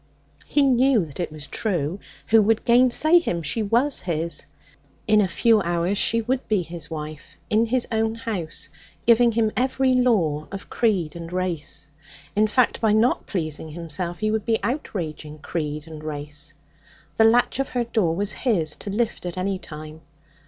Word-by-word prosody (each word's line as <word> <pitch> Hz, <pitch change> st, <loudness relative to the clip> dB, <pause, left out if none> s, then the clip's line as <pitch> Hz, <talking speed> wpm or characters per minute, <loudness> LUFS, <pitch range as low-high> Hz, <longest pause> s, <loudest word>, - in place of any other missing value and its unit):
He 290 Hz, -, +3 dB
knew 255 Hz, -5 st, +4 dB
that 145 Hz, 0 st, -12 dB
it 175 Hz, -, -2 dB
was 155 Hz, -2 st, -8 dB
true. 180 Hz, -5 st, -2 dB, 0.3 s
Who 225 Hz, 0 st, +6 dB
would 220 Hz, +1 st, +1 dB
gainsay 255 Hz, +7 st, +5 dB
him? 175 Hz, -, -2 dB
She 160 Hz, +10 st, 0 dB
was 240 Hz, +7 st, +2 dB
his. 170 Hz, -1 st, -2 dB, 0.6 s
In 215 Hz, -1 st, +5 dB
a 195 Hz, -, +2 dB
few 220 Hz, +3 st, +3 dB
hours 175 Hz, +2 st, 0 dB
she 230 Hz, 0 st, +2 dB
would 255 Hz, +3 st, -1 dB
be 210 Hz, -4 st, +1 dB
his 165 Hz, -2 st, -7 dB
wife, 155 Hz, -1 st, -7 dB
in 220 Hz, +2 st, +3 dB
his 250 Hz, +1 st, 0 dB
own 225 Hz, 0 st, 0 dB
house, 190 Hz, -11 st, -4 dB, 0.4 s
giving 235 Hz, 0 st, +5 dB
him 220 Hz, -1 st, +2 dB
every 260 Hz, +2 st, +2 dB
law 190 Hz, -13 st, +2 dB
of 195 Hz, 0 st, -8 dB
creed 185 Hz, -10 st, +1 dB
and 170 Hz, 0 st, -7 dB
race. 175 Hz, -6 st, -3 dB, 0.5 s
In 215 Hz, +1 st, +4 dB
fact, 245 Hz, +3 st, +2 dB
by 220 Hz, -2 st, +3 dB
not 225 Hz, +4 st, +2 dB
pleasing 160 Hz, -4 st, -3 dB
himself 170 Hz, +2 st, -5 dB
he 215 Hz, 0 st, 0 dB
would 220 Hz, -1 st, 0 dB
be 225 Hz, 0 st, +1 dB
outraging 165 Hz, -, -4 dB
creed 150 Hz, -1 st, -4 dB
and 155 Hz, -1 st, -9 dB
race. 150 Hz, +1 st, -4 dB, 0.6 s
The 220 Hz, -, +6 dB
latch 240 Hz, +4 st, +3 dB
of 270 Hz, -, -1 dB
her 245 Hz, -1 st, 0 dB
door 215 Hz, -8 st, 0 dB
was 205 Hz, +3 st, -1 dB
his 175 Hz, -, 0 dB
to -, -, -7 dB
lift 220 Hz, +3 st, -1 dB
at 175 Hz, -, -6 dB
any 190 Hz, +1 st, -1 dB
time. 155 Hz, -1 st, -10 dB
200 Hz, 175 wpm, -23 LUFS, 160-230 Hz, 0.6 s, Who